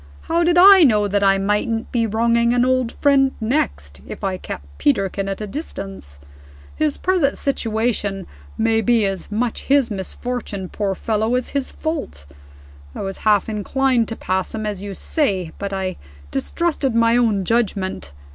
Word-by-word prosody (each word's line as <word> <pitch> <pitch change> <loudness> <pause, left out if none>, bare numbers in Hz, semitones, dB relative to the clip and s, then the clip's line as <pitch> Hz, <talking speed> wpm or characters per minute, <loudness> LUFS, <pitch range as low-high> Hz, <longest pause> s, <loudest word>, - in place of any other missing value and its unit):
How 335 +1 0
did 345 +1 +3
I 385 0 +9
know 210 -7 +4
that 200 0 0
I 195 0 +4
mightn't 210 +3 -1
be 230 -2 +1
wronging 235 +2 +2
an 245 0 +3
old 255 -2 +1
friend 275 -2 +3
next, 70 - -2
if - - -8
I 190 -1 0
kept 70 0 -9
Peterkin 195 +5 0
at 195 +2 -4
a - - -2
distance? 195 - -7 0.6
His 150 - 0
present 350 -7 +1
position 220 -6 -1 0.3
may 225 0 +2
be 230 -1 +3
as 195 +1 -4
much 230 +2 -2
his 275 -4 +3
misfortune, 200 0 -5
poor 200 -2 -2
fellow, 220 +3 0
as 250 - -1
his 280 -2 -2
fault. 300 - -5 0.7
I - - -5
was 195 0 -5
half 210 -3 +2
inclined 235 +3 0
to 225 - -5
pass 190 +1 -2
him, 220 -1 -4
as 205 -3 -4
you 200 -1 -6
say 190 - -1
but 200 0 -4
I 190 -2 -3 0.3
distrusted 280 - -1
my 230 0 +4
own 220 -6 +2
judgment. 195 - -1
220 Hz, 165 wpm, -20 LUFS, 195-250 Hz, 0.7 s, I